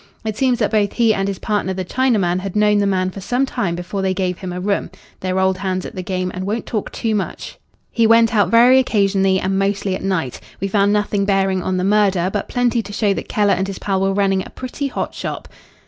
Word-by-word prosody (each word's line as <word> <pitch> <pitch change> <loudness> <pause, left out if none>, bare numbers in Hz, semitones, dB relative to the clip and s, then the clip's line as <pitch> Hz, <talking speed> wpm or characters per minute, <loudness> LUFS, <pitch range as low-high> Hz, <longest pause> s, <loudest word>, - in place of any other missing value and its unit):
It 215 -1 -2
seems 255 0 +2
that - - 0
both 210 -3 +1
he 230 -2 +3
and 195 -1 -1
his 195 -1 -3
partner 205 -3 -1
the 185 0 -3
Chinaman 205 -7 +1
had 195 0 -6
known 210 0 +3
the 200 - +2
man 185 -1 0
for 195 - -8
some 245 +7 0
time 175 -9 -2
before 180 +3 -4
they 190 -1 0
gave 180 -2 -2
him 185 -2 -5
a 180 - -4
room. 200 +2 -1 0.3
They're 185 0 -2
old 190 0 +1
hands 185 -1 -2
at - - -7
the 185 - -5
game 185 0 -2
and 185 - -4
won't 215 +4 -2
talk 215 -3 -3
too 225 -1 -2
much. 205 -2 -4 0.3
He 230 -1 +3
went 230 +1 +5
out 205 -5 +3
very 240 +4 +6
occasionally, 195 -5 +2
and 190 +1 -1
mostly 195 0 0
at - - -6
night. 175 -10 -2 0.2
We 195 - -1
found 200 0 +2
nothing 205 -1 +1
bearing 195 -1 +1
on 185 +1 -1
the 180 - -1
murder, 195 -3 +2
but 205 - -3
plenty 245 -1 +1
to 205 - -10
show 205 -1 +1
that - - -6
Keller 205 -1 +2
and 190 - -1
his 195 - -5
pal 195 -2 -1
were 195 0 +2
running 195 -1 +1
a - - -11
pretty 260 +2 -5
hot - - -4
shop." - - -5
195 Hz, 245 wpm, -19 LUFS, 190-215 Hz, 0.3 s, very